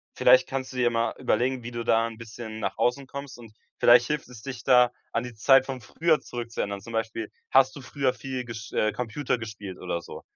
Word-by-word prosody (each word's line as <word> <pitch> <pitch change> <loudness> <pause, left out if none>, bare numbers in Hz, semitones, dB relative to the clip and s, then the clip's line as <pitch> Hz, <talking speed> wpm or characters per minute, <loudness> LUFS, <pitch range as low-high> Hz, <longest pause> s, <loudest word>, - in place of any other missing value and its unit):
vielleicht - - +6
kannst 130 -1 -4
du - - -7
dir 125 - +2
ja 120 - +4
mal 115 0 0
überlegen, 125 0 0
wie 120 - -6
du 120 0 -4
da 115 0 +3
'n 115 -1 -9
bisschen 110 -1 -8
nach - - -3
außen 130 +2 0
kommst, 140 -2 -8
und 115 -3 -13 0.3
vielleicht 120 0 +7
hilft 150 -1 -2
es, 120 -3 -11
dich 125 -1 -7
da, 125 -2 +5 0.2
an 115 - 0
die 125 - -7
Zeit 135 +4 +5
von 130 -2 -5
früher 160 +9 +1
zurückzuerinnern. 115 -4 -4
Zum 115 - -10
Beispiel, 115 -1 -3 0.2
hast 135 0 +5
du 140 - -8
früher 130 0 -1
viel 130 -2 -5
gesch 110 -2 -8
äh, 110 - +2
Computer 125 +3 -2
gespielt 105 -4 -7
oder 85 -2 -3
so? - - -10
120 Hz, 225 wpm, -26 LUFS, 115-130 Hz, 0.3 s, vielleicht